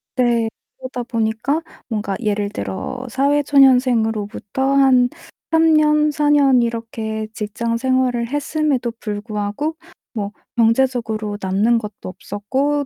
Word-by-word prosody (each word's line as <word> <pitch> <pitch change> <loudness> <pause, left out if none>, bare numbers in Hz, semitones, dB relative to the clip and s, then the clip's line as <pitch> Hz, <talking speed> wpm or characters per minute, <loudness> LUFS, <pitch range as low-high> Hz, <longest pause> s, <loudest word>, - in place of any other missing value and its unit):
네 235 -3 +2 0.3
그러다 255 -1 -5
보니까 230 +5 -1 0.3
뭔가 210 -3 -2
예를 205 -1 0
들어 250 +5 -5
사회 280 +4 +2
초년생으로부터 250 -6 +2 0.2
한 255 -2 +5 0.4
3 325 -1 +4
년 300 0 +3
4 295 0 +1
년 270 -4 +5
이렇게 225 -2 -4
직장 225 +2 -3
생활을 255 -2 +1
했음에도 290 -3 -1
불구하고 210 +7 -3 0.4
뭐 205 -2 -3 0.3
경제적으로 225 -3 +1
남는 205 +5 +2
것도 210 -4 -6
없었고 265 +10 -2
235 Hz, 250 characters per minute, -20 LUFS, 215-270 Hz, 0.4 s, 한